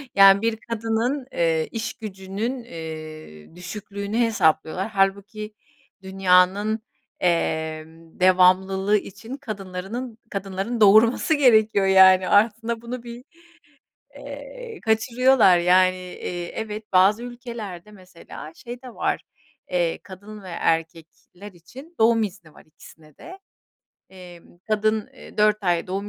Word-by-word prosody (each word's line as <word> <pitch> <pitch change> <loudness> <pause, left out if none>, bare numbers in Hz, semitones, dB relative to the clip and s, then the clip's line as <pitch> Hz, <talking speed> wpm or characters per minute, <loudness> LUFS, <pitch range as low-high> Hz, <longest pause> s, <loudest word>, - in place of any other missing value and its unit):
Yani, 195 0 +7
bir 225 0 0
kadının, 230 +4 -1
eee, 165 -2 0
işgücünün, 220 +1 -5
eee, 155 - -10
düşüklüğünü 200 +3 -6
hesaplıyorlar 190 -4 +1
hâlbuki 200 +1 -1 0.5
dünyanın, 190 +3 +2 0.4
emm, 160 -1 -2
devamlılığı 190 +2 +4
için 225 +6 -8
kadınlarının 215 0 -6
kadınların 195 +4 -4
doğurması 220 +8 +5
gerekiyor, 220 -8 +4
yani, 190 -1 +6
aslında 225 +2 +2
bunu 235 +1 -7
bir, 240 +1 -10 0.9
eee, - - -9
kaçırıyorlar, 230 -2 +4
yani. 185 +1 +4
Eee, 180 -1 -6
evet, 215 -1 -6
bazı 195 +5 +4
ülkelerde 235 -6 -8
mesela 180 -5 -12
şey 240 +5 -9
de 255 -2 -11
var, - - -1 0.5
eee, 175 -2 0
kadın 205 0 -11
ve 185 - -9
erkekler 165 +3 -4
için 260 - -14
doğum 225 0 +4
izni 180 -6 -8
var - - -18
ikisine 155 -1 -18
de. 370 +3 -12 0.7
Emm, 175 -2 -15
kadın, 215 +1 0
eee, - - -15
4 210 0 +3
ay 175 -2 +1
doğum 195 +2 -4
200 Hz, 110 wpm, -23 LUFS, 180-225 Hz, 0.9 s, Yani